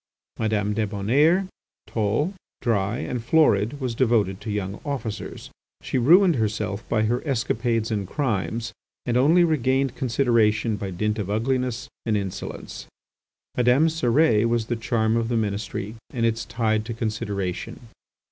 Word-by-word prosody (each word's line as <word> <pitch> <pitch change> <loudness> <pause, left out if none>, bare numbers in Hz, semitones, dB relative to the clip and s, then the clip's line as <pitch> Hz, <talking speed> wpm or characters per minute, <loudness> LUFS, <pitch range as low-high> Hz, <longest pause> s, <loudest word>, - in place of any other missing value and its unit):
Madame 105 -2 0
Débonnaire, 115 - +2 0.4
tall, 115 - 0 0.3
dry, 105 -1 0
and 125 -2 -4
florid, 120 -2 +3
was 130 -3 -2
devoted 115 -6 +1
to 115 - -6
young 100 -1 -3
officers. 120 -8 -5 0.3
She 130 - -1
ruined 170 +5 +5
herself 105 -1 -2
by 110 -2 +2
her 120 +3 0
escapades 115 -4 0
and 100 -3 -2
crimes 115 -2 -2 0.3
and 120 - 0
only 155 +8 +5
regained 135 -4 +1
consideration 115 -4 +2
by 100 -1 -4
dint 105 +4 -1
of 100 -2 -3
ugliness 120 +2 -1 0.2
and 110 -2 +1
insolence. 95 -2 -6 0.7
Madame 125 +6 +4
Cérès 120 -6 +3
was 115 -1 +1
the 120 - -2
charm 115 -1 0
of 115 -1 0
the 120 0 0
Ministry 105 -1 -3 0.2
and 115 -2 -1
its 115 0 0
tide 110 -2 0
to 115 0 -5
consideration. 110 -2 -3
115 Hz, 140 wpm, -24 LUFS, 105-125 Hz, 0.7 s, ruined